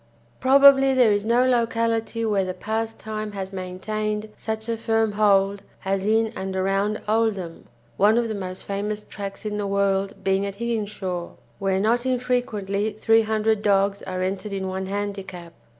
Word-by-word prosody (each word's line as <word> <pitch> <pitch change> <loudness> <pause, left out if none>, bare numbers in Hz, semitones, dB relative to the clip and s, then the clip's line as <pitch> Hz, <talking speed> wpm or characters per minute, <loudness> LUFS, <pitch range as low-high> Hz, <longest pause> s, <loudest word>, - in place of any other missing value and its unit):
Probably 270 0 +6
there 245 -4 +5
is 205 0 +1
no 235 +2 +3
locality 230 -2 0
where 205 -3 +1
the 185 -1 -4
pastime 220 0 -4
has 195 -1 -5
maintained 210 +3 -3
such 220 0 -4
a 230 - 0
firm 225 -1 +1
hold 200 -1 +3 0.2
as 195 +1 0
in 220 +1 +2
and 190 0 -4
around 195 +3 0
Oldham, 210 -6 -1 0.3
one 210 +3 +4
of 235 -1 +1
the 220 - -3
most 185 -2 -6
famous 210 +1 -3
tracks 200 +1 -7
in 210 -1 -2
the 205 -1 -2
world 195 0 0
being 195 0 +2
at 200 -1 -4
Higginshaw, 205 -6 -3 0.3
where 195 -1 +1
not 235 +5 +1
infrequently 220 -5 -1
three 225 +1 +3
hundred 220 -1 +1
dogs 200 -1 +2
are 185 -1 -3
entered 195 +2 -3
in 190 -1 -3
one 190 0 -3
handicap. 190 -4 -5
210 Hz, 160 wpm, -24 LUFS, 195-225 Hz, 0.3 s, Probably